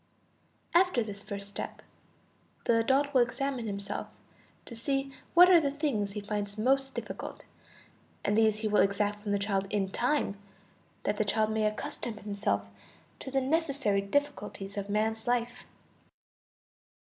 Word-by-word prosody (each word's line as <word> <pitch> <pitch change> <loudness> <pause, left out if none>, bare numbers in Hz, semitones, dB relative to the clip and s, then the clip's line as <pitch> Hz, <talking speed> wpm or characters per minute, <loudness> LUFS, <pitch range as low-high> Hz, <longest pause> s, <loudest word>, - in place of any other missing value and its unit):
After 350 -9 +4
this 200 -2 -6
first 200 0 -6
step 200 - -6 0.8
the 230 - +4
adult 275 +5 +2
will 255 - +6
examine 255 -1 -1
himself 200 0 -4 0.6
to 235 - -8
see 270 +3 -1 0.2
what 355 +1 +10
are 360 -2 +8
the 290 -3 +1
things 275 -9 -1
he 210 - -4
finds 205 0 -3
most 270 +4 +2
difficult, - - -6 0.8
and 205 - +2
these 220 -1 +3
he 220 - 0
will 210 0 +4
exact 205 +1 +1
from 210 -1 -4
the 200 - +3
child 195 -1 -1
in 195 -2 0
time, 240 -3 0 0.6
that 205 - 0
the - - +2
child 215 +1 +1
may 220 0 +1
accustom 230 0 -4
himself 200 - -1 0.5
to - - -6
the 270 0 +1
necessary 275 -8 +1
difficulties 200 -4 -2
of 200 0 -4
man's 220 +2 0
life. 245 0 0
220 Hz, 145 wpm, -30 LUFS, 205-270 Hz, 0.8 s, what